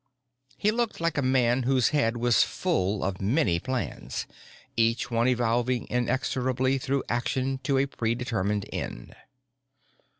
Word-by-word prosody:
He 210 - +2
looked 235 0 -1
like 170 -1 0
a 145 - +1
man 130 -1 +2
whose 130 -1 +3
head 120 -6 +1
was 120 -2 +3
full 95 +2 0
of 95 -1 -2
many 100 - +2
plans, 130 +5 -4 0.5
each 115 +2 +1
one 115 +1 +2
evolving 120 0 +1
inexorably 130 +1 0
through 135 +1 -1
action 130 +2 -1
to 135 0 0
a 135 - +3
predetermined 115 -5 -1
end. - - -6
125 Hz, 130 wpm, -27 LUFS, 115-135 Hz, 0.5 s, whose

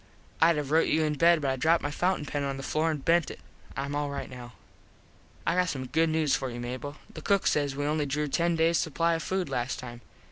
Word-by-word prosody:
Id 165 +1 +6
have 145 -1 -3
rote 160 +1 +4
you 160 +1 +2
in 155 -1 +1
bed 165 +1 +4
but 135 - +1
I - - 0
dropped 165 +5 +2
my 145 - -2
fountin 180 0 0
pen 145 0 -3
on 140 -1 -2
the 135 - -7
floor 155 +3 0
an 155 - -1
bent 165 +3 +2
it. - - -9 0.4
Im 140 +1 -3
all 145 0 -1
right 140 -1 -5
now. 125 -1 -9 0.9
I 170 - +2
got 180 0 +2
some 130 -4 -4
news 160 -2 +2
for 130 - -3
you, 120 0 -6
Mable. 130 +4 -5 0.2
The 155 - -8
cook 200 +4 +1
says 145 -2 +1
we 145 +1 -2
only 150 0 0
drew 150 +2 -1
ten 170 +4 +1
days 165 +1 +3
supply 165 +2 +1
of 165 - -1
food 185 +1 -2
last 125 -2 -2
time. 120 -1 -9
150 Hz, 245 wpm, -28 LUFS, 135-165 Hz, 0.9 s, Id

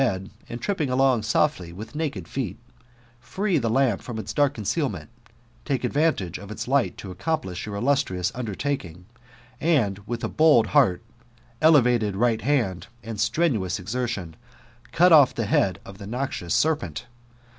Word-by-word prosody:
St 95 -8 +1
feed, 95 - -13 0.2
and 120 - -5
iri^Jping 160 -3 -1
along 130 -2 +3
$6ffly 105 - 0
wfA 110 +7 -9 0.2
Wked - - -8
feet, 120 -9 -4 0.6
free 175 - -1
(tit 115 -3 -1
kthi^ 130 -4 +2
fijprti 120 -3 -7
its 110 0 -5
dark 145 -2 +2
coticealment, 105 - -2 0.5
talce 135 -4 -2
advantage 125 - 0
6t - - -10
itd 110 - -6
tight 135 0 +1
to 95 -2 -8
acc6mplis{j 95 - -3
your 105 - -5
illustrious 100 -7 0
undertaking, 105 - -4 0.5
and 125 - +1
with 120 0 -4
a - - -1
t)9ld 140 - +4 0.6
^earyeteVated 125 -9 +4
right 115 +1 +1
hand, 115 -10 0 0.2
and 110 -2 -6
strenuotrd 110 - 0
exertion, 105 -5 -4 0.6
cut 180 +2 +5
off 145 -5 +7
the 115 - -1
h^d 95 -2 +2
of 95 0 -11
(n6 100 - -8
noxious 120 -8 -2
serperit. 120 - 0
120 Hz, 150 wpm, -24 LUFS, 95-140 Hz, 0.6 s, off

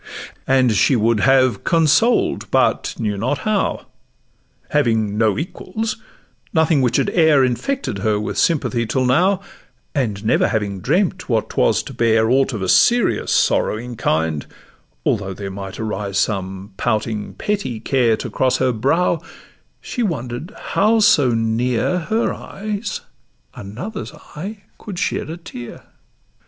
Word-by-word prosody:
And 130 -2 +4
she 110 +6 +3
would 115 -1 +2
have 130 -3 +3
consoled, 165 - +2
but - - +1
knew 105 -2 -2
not 130 +7 0
how: 215 -2 0 0.9
Having 110 -8 +1
no 110 -2 +2
equals, 215 +7 -4 0.5
nothing 160 -3 +3
which 125 -2 +2
had - - +1
e'er 155 -5 +4
Infected 130 - -2
her 105 +1 +1
with 105 - -4
sympathy 130 -8 +1
till 130 +2 0
now, 180 +10 +3 0.5
And 110 -8 -2
never 110 - +3
having 105 -4 -2
dreamt 180 - 0
what 115 -3 0
'twas - - +2
to - - -9
bear 110 0 +2
Aught 135 +1 +3
of 105 -4 -3
a - - -1
serious, 240 - +3
sorrowing 120 +3 +1
kind, 80 -6 -1 0.6
although 95 -1 -1
There 100 0 -6
might 95 -1 -7
arise 105 -3 -3
some 95 -1 -2
pouting 110 -2 -2
petty 195 - -2
care 120 -2 +2
To - - -5
cross 130 -1 +1
her 130 -1 +2
brow, 150 +8 +1 0.6
she 245 - -4
wonder'd 145 - -3
how 215 +3 +2
so 155 - +5
near 115 +8 0
Her 220 +7 0
eyes 205 0 -5 0.5
another's 155 - -7 0.2
eye 200 +6 -7 0.2
could 200 -5 -8
shed 155 - -2
a 165 - -5
tear. 120 -8 -9
125 Hz, 140 wpm, -20 LUFS, 110-170 Hz, 0.9 s, so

